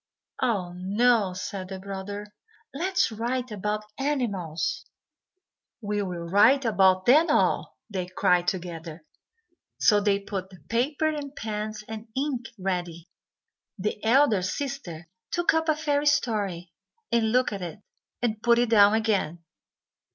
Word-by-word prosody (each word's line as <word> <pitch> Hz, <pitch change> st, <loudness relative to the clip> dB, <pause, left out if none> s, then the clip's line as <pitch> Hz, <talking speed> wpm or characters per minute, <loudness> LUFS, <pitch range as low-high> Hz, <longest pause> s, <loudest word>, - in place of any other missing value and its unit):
"Oh, 200 Hz, -8 st, 0 dB
no," 205 Hz, +2 st, +2 dB
said 185 Hz, +1 st, -5 dB
the 190 Hz, -, -5 dB
brother, 200 Hz, +2 st, -7 dB, 0.4 s
"let's 360 Hz, 0 st, +1 dB
write 240 Hz, +3 st, -2 dB
about 210 Hz, +1 st, -2 dB, 0.2 s
animals." 200 Hz, -, -1 dB, 1.0 s
"We 205 Hz, -2 st, -2 dB
will 175 Hz, -3 st, -4 dB
write 225 Hz, +9 st, +5 dB
about 190 Hz, -4 st, +4 dB
them 305 Hz, +7 st, +6 dB
all," -, -, +1 dB
they 185 Hz, -4 st, -4 dB
cried 180 Hz, -1 st, +2 dB
together. 170 Hz, -3 st, -4 dB, 0.7 s
So 210 Hz, -2 st, +5 dB
they 200 Hz, -1 st, +2 dB
put 195 Hz, -2 st, -5 dB
the 185 Hz, -2 st, -15 dB
paper, 275 Hz, +7 st, +1 dB
and 290 Hz, -2 st, -5 dB
pens, 215 Hz, 0 st, -4 dB
and 220 Hz, +1 st, -7 dB
ink 265 Hz, -3 st, -2 dB
ready. 175 Hz, -3 st, -3 dB, 0.7 s
The 210 Hz, +1 st, -3 dB
elder 230 Hz, -3 st, +4 dB
sister 185 Hz, -, -4 dB, 0.2 s
took 345 Hz, 0 st, +2 dB
up 320 Hz, 0 st, +1 dB
a 310 Hz, -, +4 dB
fairy 295 Hz, -1 st, 0 dB
story 205 Hz, -, 0 dB, 0.4 s
and 225 Hz, -2 st, +2 dB
looked 250 Hz, -2 st, +2 dB
at 200 Hz, -, -5 dB
it, 175 Hz, +2 st, -6 dB, 0.5 s
and 220 Hz, -3 st, -1 dB
put 235 Hz, 0 st, +4 dB
it 240 Hz, -1 st, +1 dB
down 205 Hz, -1 st, +7 dB
again. 195 Hz, -7 st, 0 dB
210 Hz, 135 wpm, -26 LUFS, 185-245 Hz, 1.0 s, down